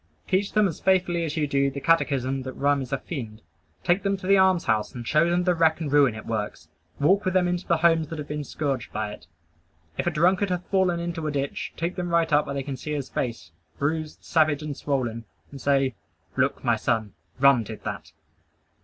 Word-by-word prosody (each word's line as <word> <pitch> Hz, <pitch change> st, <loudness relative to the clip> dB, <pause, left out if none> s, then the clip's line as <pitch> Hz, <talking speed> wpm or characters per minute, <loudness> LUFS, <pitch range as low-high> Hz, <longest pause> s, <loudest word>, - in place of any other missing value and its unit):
Teach 195 Hz, +1 st, 0 dB
them 215 Hz, -1 st, +4 dB
as 165 Hz, -, -5 dB
faithfully 180 Hz, -3 st, +2 dB
as 155 Hz, 0 st, -4 dB
you 150 Hz, -, +2 dB
do 140 Hz, -1 st, +1 dB
the 140 Hz, -, -6 dB
catechism, 135 Hz, -4 st, +1 dB
that 130 Hz, 0 st, -6 dB
rum 140 Hz, 0 st, +1 dB
is 130 Hz, -, -7 dB
a 135 Hz, -, +1 dB
fiend. 115 Hz, -, -7 dB, 0.4 s
Take 175 Hz, +3 st, +2 dB
them 195 Hz, 0 st, 0 dB
to 190 Hz, -, -10 dB
the 195 Hz, +1 st, +5 dB
alms 190 Hz, -2 st, +4 dB
house 110 Hz, +3 st, 0 dB
and 120 Hz, -1 st, -6 dB
show 155 Hz, +3 st, +3 dB
them 175 Hz, +1 st, +2 dB
the 180 Hz, 0 st, +3 dB
wreck 160 Hz, -1 st, +3 dB
and 155 Hz, -4 st, -3 dB
ruin 140 Hz, -6 st, +4 dB
it 110 Hz, -, -8 dB
works. 105 Hz, -8 st, -4 dB, 0.3 s
Walk 190 Hz, +8 st, +3 dB
with 185 Hz, -1 st, -1 dB
them 180 Hz, -1 st, +4 dB
into 175 Hz, +1 st, -2 dB
the 170 Hz, -, +3 dB
homes 165 Hz, -1 st, +3 dB
that 165 Hz, -, -6 dB
have 150 Hz, -1 st, -6 dB
been 150 Hz, 0 st, -3 dB
scourged 135 Hz, -3 st, -3 dB
by 105 Hz, 0 st, -3 dB
it. -, -, -12 dB, 0.7 s
If -, -, 0 dB
a -, -, +5 dB
drunkard 180 Hz, +5 st, +2 dB
hath 180 Hz, -1 st, -2 dB
fallen 185 Hz, -3 st, +2 dB
into 170 Hz, -2 st, -3 dB
a -, -, -1 dB
ditch, 140 Hz, -1 st, -3 dB
take 170 Hz, +2 st, -2 dB
them 175 Hz, -1 st, -2 dB
right 165 Hz, -2 st, +2 dB
up 145 Hz, +1 st, +4 dB
where 140 Hz, -, -4 dB
they 135 Hz, -, -2 dB
can 135 Hz, -1 st, -5 dB
see 150 Hz, +4 st, -5 dB
his 140 Hz, -3 st, -3 dB
face, 115 Hz, -11 st, -4 dB, 0.3 s
bruised, 155 Hz, +2 st, -2 dB
savage 155 Hz, -2 st, +2 dB
and 150 Hz, -2 st, -4 dB
swollen, 120 Hz, -6 st, -2 dB, 0.3 s
and 140 Hz, -2 st, -9 dB
say, 135 Hz, -1 st, +2 dB, 0.4 s
"Look, -, -, 0 dB
my -, -, +2 dB
son: 110 Hz, -3 st, -1 dB, 0.3 s
Rum 140 Hz, -2 st, +6 dB
did 110 Hz, -, -8 dB
that!" -, -, -6 dB
150 Hz, 225 wpm, -25 LUFS, 135-175 Hz, 0.7 s, Rum